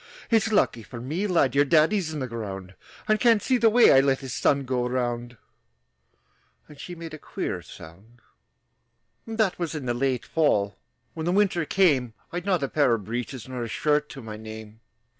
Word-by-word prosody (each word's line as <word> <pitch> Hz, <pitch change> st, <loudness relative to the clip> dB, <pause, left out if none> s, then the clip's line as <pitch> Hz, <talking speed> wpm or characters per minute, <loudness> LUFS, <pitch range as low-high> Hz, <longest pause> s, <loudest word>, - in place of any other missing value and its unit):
"It's 225 Hz, 0 st, +3 dB
lucky 195 Hz, -, +2 dB
for 120 Hz, +2 st, -9 dB
me, 155 Hz, -, -2 dB
lad, 165 Hz, -8 st, +2 dB
Your 140 Hz, +1 st, +5 dB
daddy's 160 Hz, +4 st, +2 dB
in 150 Hz, -2 st, -4 dB
the 130 Hz, -, -2 dB
ground, 100 Hz, -5 st, -6 dB, 0.3 s
And 215 Hz, 0 st, +3 dB
can't 230 Hz, -3 st, +5 dB
see 255 Hz, +3 st, +1 dB
the 225 Hz, -1 st, +5 dB
way 240 Hz, +2 st, +6 dB
I 135 Hz, -, +7 dB
let 135 Hz, -1 st, +2 dB
His 130 Hz, -2 st, -6 dB
son 140 Hz, +2 st, +2 dB
go 125 Hz, -1 st, -1 dB
around!" 120 Hz, -1 st, -3 dB, 1.3 s
And 150 Hz, -2 st, -15 dB
she 175 Hz, +4 st, -7 dB
made 165 Hz, -1 st, -8 dB
a 155 Hz, -, -8 dB
queer -, -, -4 dB
sound. 100 Hz, +9 st, -14 dB, 1.1 s
That 220 Hz, -5 st, 0 dB
was 170 Hz, -2 st, -3 dB
in 145 Hz, -4 st, -5 dB
the 120 Hz, -, 0 dB
late 130 Hz, 0 st, -1 dB
fall. 105 Hz, -11 st, +1 dB, 0.4 s
When 160 Hz, 0 st, -4 dB
the -, -, +2 dB
winter 195 Hz, -3 st, +2 dB
came, 140 Hz, -, +2 dB, 0.2 s
I'd 175 Hz, +3 st, -5 dB
not 180 Hz, -7 st, +1 dB
a -, -, +1 dB
pair 135 Hz, -4 st, +2 dB
of 105 Hz, -4 st, -7 dB
breeches 120 Hz, +1 st, -5 dB
Nor 130 Hz, -1 st, -5 dB
a 120 Hz, -, -3 dB
shirt 150 Hz, +5 st, 0 dB
to 135 Hz, -, -9 dB
my 110 Hz, -1 st, -7 dB
name. 110 Hz, 0 st, -10 dB
135 Hz, 195 wpm, -25 LUFS, 120-175 Hz, 1.3 s, I